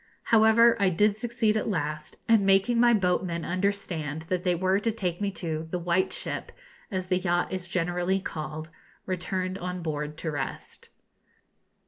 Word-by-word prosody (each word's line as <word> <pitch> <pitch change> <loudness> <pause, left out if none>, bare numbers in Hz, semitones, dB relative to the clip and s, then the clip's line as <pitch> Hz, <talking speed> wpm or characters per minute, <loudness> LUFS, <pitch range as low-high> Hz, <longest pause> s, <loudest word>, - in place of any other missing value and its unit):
However, 225 +1 +6
I 200 -1 +4
did 205 +4 +3
succeed 225 -1 0
at 215 - 0
last, 155 -4 -3
and 225 -3 +5
making 195 +5 +3
my 240 0 +6
boatmen 180 -5 +1
understand 175 -5 -2
that 180 -1 -1
they 180 -2 +2
were 190 +3 +2
to 225 +2 0
take 185 -5 -3
me 200 - +1
to 160 -3 -3
'the 180 - -2
white 175 +1 +1
ship,' - - -4 0.4
as 190 -4 -2
the 185 0 +1
yacht 175 -1 0
is 185 -1 -3
generally 180 +2 0
called, 155 -2 -6 0.3
returned 185 +1 -2
on 180 0 -4
board 150 -1 -3
to 160 - -3
rest. 140 -2 -5
185 Hz, 160 wpm, -27 LUFS, 170-200 Hz, 0.4 s, However